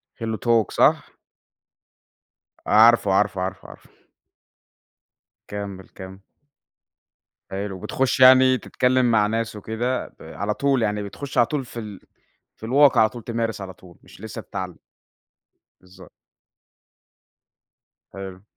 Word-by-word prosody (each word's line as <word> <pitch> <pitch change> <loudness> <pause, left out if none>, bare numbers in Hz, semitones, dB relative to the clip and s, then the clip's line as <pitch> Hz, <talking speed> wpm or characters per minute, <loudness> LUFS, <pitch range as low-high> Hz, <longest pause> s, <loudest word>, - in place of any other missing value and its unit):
HelloTalk 115 -1 0
صح؟ - - +2 1.5
عارفه، 110 -2 +5
عارفه، 95 -1 +1
عارفه، 95 +1 -5
عارفه. - - -15 1.6
كمِّل، 100 -2 -7
كمِّل. 95 0 -11 1.3
حلو 95 0 -5
بتخش 130 +6 -1
يعني 130 0 +7
تتكلم 125 -1 +1
مع 105 -2 +3
ناس 115 0 -3
وكده 115 +5 -3
ب - - -13
على 100 +2 -4
طول 135 +1 0
يعني 105 -1 -1
بتخش 135 +8 -8
على 120 - +5
طول 145 -3 -3
في 120 - -9
ال 105 -4 -8 0.6
في - - -11
الواقع 140 +3 +4
على 110 - +4
طول 120 0 -10
تمارس 115 -2 -3
على 95 -1 -7
طول، 90 -1 -18
مش - - -17
لسه 110 0 -7
هتتعلم. 90 -2 -7 1.0
بالضبط. 90 0 -17 2.0
حلو. 95 -1 -9
110 Hz, 115 wpm, -22 LUFS, 95-120 Hz, 2.0 s, يعني